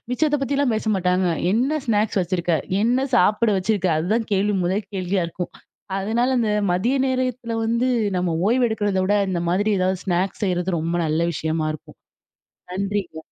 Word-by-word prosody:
மிச்சத்தை 295 +3 +1
பத்திலாம் 275 -2 +1
பேச 220 - -3
மாட்டாங்க, 180 0 +1 0.2
"என்ன 245 +8 +1
ஸ்நாக்ஸ் 215 -3 +1
வச்சிருக்க? 175 -1 -1 0.3
என்ன 250 +4 +2
சாப்பிட 225 0 +3
வச்சுருக்க? 190 -1 0
அதுதான் 215 +8 0
கேள்வி, 200 +1 +2
முதல் 190 +3 0
கேள்வியாக 185 -1 -1
இருக்கும். 180 +1 -5 0.5
அதனால 230 +6 0
அந்த 225 -3 +1 0.2
மதிய 230 +9 +1
நேரத்தில 255 -3 -2
வந்து 235 +3 +1 0.3
நம்ம 180 -1 0 0.2
ஓய்வு 245 +1 +3
எடுக்கிறத 205 -3 -1
விட, 205 +2 +2
இந்த 175 -2 -1
மாதிரி 205 +4 +1
எதாவது 185 0 0
ஸ்நாக்ஸ் 185 +3 -1
செய்றது 180 -1 0
ரொம்ப 165 +2 -2
நல்ல 155 +2 0
விஷயமா 160 -1 -1
இருக்கும். 150 - -13 0.7
நன்றிங்க. 195 -3 -3
200 Hz, 155 wpm, -22 LUFS, 180-230 Hz, 0.7 s, சாப்பிட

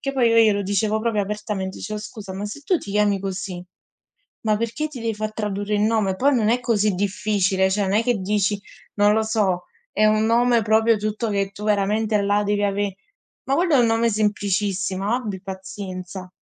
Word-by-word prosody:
che 275 - -3
poi 250 -4 +3
io 230 - +3
glielo 215 -3 +4
dicevo 210 +2 0
proprio 220 -2 0
apertamente, 205 -2 -4
dicevo: 215 +1 -5
"Scusa, 210 -3 -8
ma 195 +2 -4
se 210 +8 -7
tu 370 - +2
ti 200 - -9
chiami 205 -1 +2
così, 185 -2 -5 0.8
ma 215 -1 +1
perché 230 +7 -2
ti 270 - -8
devi 230 -1 -2
far 215 +1 -3
tradurre 210 -1 -2
il 205 - +1
nome?" 215 -3 +1
Poi 280 +4 +3
non 220 -3 +2
è 240 +2 +2
così 215 -4 +1
difficile, 195 -1 +1
cioè 205 +1 +1
non 190 0 -1
è 220 +3 +3
che 245 -1 +1
dici, 200 +1 0 0.4
non 205 0 +4
lo 220 0 +2
so, 200 -5 0 0.3
è 215 - +3
un 215 0 +3
nome 235 +1 +3
proprio 220 +1 +3
tutto 215 +2 -2
che 200 -1 -1
tu 205 +1 -8
veramente 210 +1 +1
là 205 +1 +2
devi 205 0 0
ave 200 -1 -1 0.5
ma 270 - +1
quello 340 -1 +2
è - - +5
un 235 - +4
nome 225 +1 +2
semplicissimo, 205 -1 0
abbi 215 -7 -3
pazienza. 190 -1 -7
210 Hz, 200 wpm, -22 LUFS, 200-220 Hz, 0.8 s, è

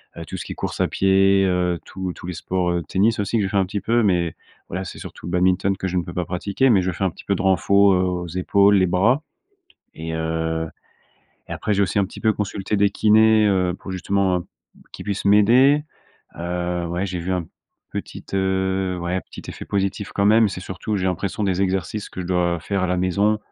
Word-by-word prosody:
heu, 85 - -7
tout - - -6
ce - - -6
qui - - -6
est - - -16
course - - -4
à - - +3
pied, 95 0 +3
heu, 90 -2 0
tous 95 -1 -5
tous - - -11
les 90 - -4
sports, 90 +1 -1
heu, 85 0 0
tennis 105 +4 +2
aussi, 105 +3 0
que 105 - +1
je 95 - -1
fais 100 - -1
un 95 - +3
petit 100 +1 -4
peu. 115 +3 +2
Mais 90 -6 +1 0.3
voilà, 95 +2 -4
c'est - - -8
surtout - - -10
le 85 - -5
badminton 95 +2 +2
que 95 - -6
je 90 - -2
ne - - +2
peux 85 - -8
pas 90 - -2
pratiquer 100 +9 0
mais 100 -6 +5
je 90 - -1
fais 90 - -4
un 95 - +1 0.2
peu 100 - +2
de - - -3
renfo, 95 +1 +4
heu, - - +3
aux 90 -1 -2
épaules, 100 +4 +3
les 95 -2 +4
bras 110 - +2 0.7
et 80 +1 -6
heu, 80 0 -2 0.8
et - - -3
après, 105 - -1
j'ai 100 - +1
aussi 95 +1 0
un 100 - +2
petit 95 - -11
peu 110 -1 +3
consulté 105 0 -3
des 100 0 +4
kinés, 110 +1 +4
heu, 90 -3 +1
pour - - -10
justement, 95 0 0
heu, 85 - -9 0.5
qu'ils - - -9
puissent 100 -2 -3
m'aider, 120 +9 +5 0.6
heu, 90 0 -2
ouais, 85 +3 -2
j'ai 90 -1 -4
vu 90 +2 -3
un 90 -2 -1 0.5
petit, - - -6
heu, 95 -1 0
ouais, 90 +2 -1
petit - - -12
effet - - -8
positif 100 0 -2
quand 100 - +1
même. 110 +1 +5
C'est 95 - -6
surtout, 95 +3 -4
j'ai 95 - -2
l'impression 95 +3 -2
des 95 -1 0
exercices 95 +2 -2
que - - -7
je - - -7
dois 85 -1 0
faire 100 +2 -2
à - - +1
la 90 0 0
maison, 100 +4 +1
95 Hz, 230 wpm, -22 LUFS, 90-100 Hz, 0.8 s, mais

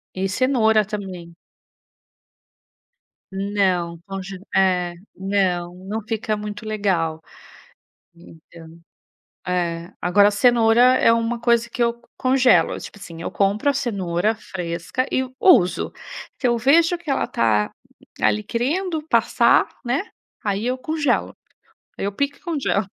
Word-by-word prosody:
E 190 +1 -1
cenoura 220 -2 +3
também. 185 -5 -7 2.0
Não, 190 -4 -1
conge 195 -1 -7 0.2
é, 180 -2 +2 0.2
não, 185 -3 -1
não 220 +3 -3
fica 220 -1 -2
muito 210 +1 -7
legal. 185 -7 -1 1.0
Então, 165 0 -15 0.7
é. 170 -1 -2
Agora 200 +4 +5
cenoura 240 +3 +4
é 230 - +4
uma 230 +1 -1
coisa 235 0 +2
que 240 - -2
eu 235 0 -1
congelo, 255 -1 +3
tipo 205 - -10
assim, 170 -4 -10
eu - - -4
compro 205 +7 +1
a - - +1
cenoura 200 -4 -1
fresca 175 +4 -4
e 260 - +1 0.2
uso. 215 - +4 0.5
Se 255 - +1
eu 240 -1 +2
vejo 330 +8 +4
que 335 -4 -7
ela - - +1
tá, 105 -2 +1 0.5
ali 105 0 +2
querendo 315 - -2
passar - - +3 0.2
né, 250 +9 0 0.4
aí 205 +2 -1
eu 255 +1 0
congelo. 305 +2 -1 0.6
Aí - - -3
eu 200 - -1
pico 280 +6 -2
e - - -29
congelo. 280 - -1
205 Hz, 125 wpm, -22 LUFS, 180-245 Hz, 2.0 s, Agora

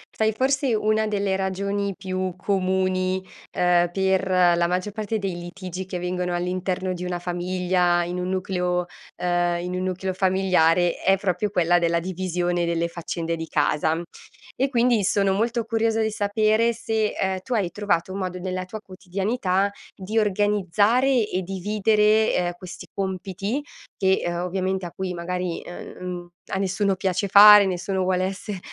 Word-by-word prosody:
Sai, 220 0 +2
forse, 265 +1 +1
una 215 0 +1
delle 200 -2 0
ragioni 200 +1 -2
più 185 -1 -3
comuni, 185 -1 0 0.2
ehm, 175 -1 +2
per 190 0 +1
la 175 -2 +4
maggior 180 +3 -2
parte 215 +1 -2
dei 195 -3 -3
litigi 180 +1 -7
che 190 - -6
avvengono 180 0 -2
all'interno 185 +1 -2
di 180 0 -6
una 180 -1 -2
famiglia, 180 0 0
in 175 +1 -4
un 180 0 -2
nucleo, 180 -1 -1 0.3
ehm, 175 -1 0
in 180 0 -4
un 185 - -2
nucleo 185 0 -2
familiare, 185 -3 +2
è 195 0 +3
proprio 195 +1 -1
quella 175 -3 +3
della 170 0 +1
divisione 175 -1 -2
delle 170 0 0
faccende 170 0 -4
di 165 0 -6
casa. 155 +2 +1 0.6
E 270 +2 0
quindi 240 -4 +2
sono 195 0 +2
molto 230 +3 0
curiosa 225 0 0
di 220 - 0
sapere 215 +2 +2
se, 220 -1 -1
ehm, 190 -1 -1
tu 250 - -5
hai 190 -6 0
trovato 200 -4 -1
un 195 - -4
modo, 185 -1 -3
nella 185 0 -4
tua 215 +3 -8
quotidianità, 195 +1 -1 0.2
di 210 +4 -1
organizzare 210 +4 +2
e 185 - -2
dividere, 210 +3 +2
ehm, 175 -1 0
questi 180 0 -10
compiti 195 +6 -3 0.3
che, 190 -1 +2
uhm, 175 - -1
ovviamente 185 +1 -2
a 170 - -6
cui, 190 +1 -4
magari, 180 0 -3
uhm, 175 - -9
mhmm, 175 -1 -5 0.2
a - - -3
nessuno 195 0 0
piace 190 +1 -1
fare, 205 +1 +9
nessuno 190 +1 -1
vuole 185 0 +1
esse 195 0 -5
185 Hz, 160 wpm, -24 LUFS, 180-205 Hz, 0.6 s, fare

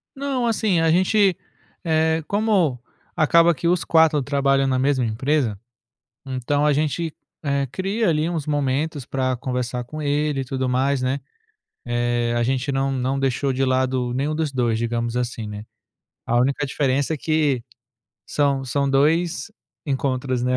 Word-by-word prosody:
Não, 270 -3 -1
assim, 215 -6 +1
a 165 0 +3
gente, 185 +2 +3 0.5
eh, 160 0 +1
como 200 - +1 0.4
acaba 170 +2 +5
que 170 - -2
os 175 0 +2
4 160 -3 +4
trabalham 135 0 +1
na 130 -1 +1
mesma 130 0 +1
empresa, 120 -1 0 0.7
então 135 +2 -1
a 150 - +4
gente, 155 +2 -1 0.3
eh, 140 -1 0
cria 195 - -1
ali 155 0 +1
uns 165 -4 -3
momentos 145 0 -1
para 130 -1 -1
conversar 125 0 -3
com 155 +6 -7
ele 145 -1 0
e - - -3
tudo 130 0 -2
mais, 130 +1 +1
né, 130 +2 -1 0.7
eh, 120 0 0
a 120 - +2
gente 130 +3 0
não 135 0 0
não 130 +1 -1
deixou 135 0 0
de 135 +1 +1
lado 130 -1 0
nenhum 140 +4 -1
dos 155 -2 -1
2, 120 -4 0
digamos 115 0 -2
assim, 120 -2 -3
né, 105 0 -7 0.6
a 120 - +1
única 135 +4 +1
diferença 140 +2 0
é - - -4
que 150 -5 0 0.6
são 140 -2 +1
são 140 +2 -1
2 160 +8 +1 0.4
encontros, 130 -2 -1
né, 125 +1 +1
140 Hz, 160 wpm, -22 LUFS, 130-155 Hz, 0.7 s, acaba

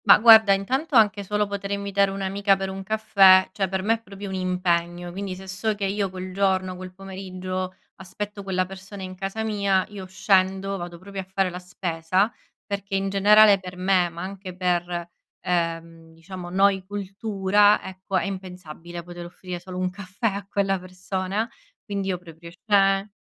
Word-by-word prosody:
Ma 200 - +9
guarda, 220 -2 +8
intanto 260 +10 -1
anche 210 -3 +4
solo 210 +2 0
potere 200 0 -3
invitare 200 0 +1
un'amica 195 +1 +1
per 195 0 -3
un 190 0 -6
caffè, 195 -2 +5
cioè 195 0 -1
per 190 0 -2
me 220 +3 +3
è 225 - -11
proprio 200 -1 -8
un - - -5
impegno, 175 -1 -1
quindi 190 +1 -5
se 190 +1 -11
so 200 +3 -1
che 200 -1 -2
io 200 0 -1
quel 185 0 -7
giorno, 190 -1 +1
quel 185 0 -8
pomeriggio 185 -1 -6 0.2
aspetto 205 +2 -6
quella 185 -1 -1
persona 195 +1 -9
in 185 0 -6
casa 195 +4 -4
mia, 200 -3 +1
io 200 -3 -8
scendo, 190 +1 +1
vado 175 -1 -7
proprio 195 +2 -7
a - - -8
fare 190 0 -1
la 180 - -6
spesa, 180 +3 -1 0.3
perché 200 -1 -4
in 195 0 0
generale 205 +1 +6
per 180 -1 -9
me, 185 -1 +2
ma 170 +1 -7
anche 190 -1 -7
per, 175 -1 -1 0.3
ehm, 165 -1 -3
diciamo 175 +1 -8
noi 195 +1 +3
cultura, 205 +1 +2
ecco 190 0 -4
è - - 0
impensabile 180 -3 -7
poter 175 0 -9
offrire 180 0 -7
solo 185 +1 -8
un 185 0 -1
caffè 195 +3 -7
a 200 0 -6
quella 195 -1 +1
persona. 185 +3 -3 0.4
Quindi 200 -2 -3
io 185 -2 0
proprio 170 -1 -12
sce 195 +2 +2
190 Hz, 175 wpm, -24 LUFS, 185-200 Hz, 0.4 s, Ma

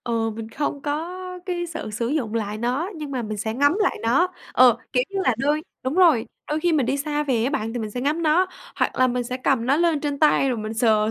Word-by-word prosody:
Ừ, 225 -1 0
mình 220 0 -7
không 285 +1 -3
có 310 +4 -2 0.3
cái 350 -2 -2
sự 325 -9 -6
sử 230 +2 -2
dụng 245 -6 -1
lại 210 -1 -2
nó, 255 - -1
nhưng 300 -2 -6
mà 255 -3 -2
mình 215 -1 -4
sẽ 220 +2 -2
ngắm 285 - +3
lại 395 - +1
nó. 270 +11 +3 0.2
Ờ, 245 -2 +6 0.2
kiểu 250 - +3
như 395 - -3
là 255 -9 +2
đôi 295 +4 +1 0.2
đúng 260 +3 -2
rồi, 330 -11 +5 0.2
đôi 300 +1 -1
khi 345 +1 +2
mình 285 -6 +2
đi 275 - +1
xa 295 +1 -1
về 250 -6 0
á 260 - +1
bạn, 225 -6 -2
thì 245 - -3
mình 215 -2 -4
sẽ 245 - -4
ngắm 300 +5 0
nó, 330 +4 +3 0.3
hoặc - - 0
là 255 - +4
mình 245 0 -1
sẽ 250 +1 -3
cầm 255 -2 +1
nó 275 +3 +3
lên 330 -3 +2
trên 285 -1 -2
tay 295 -3 +4
rồi 245 - -1
mình 215 +1 -4
sờ 220 -2 +3
265 Hz, 265 wpm, -23 LUFS, 230-305 Hz, 0.3 s, Ờ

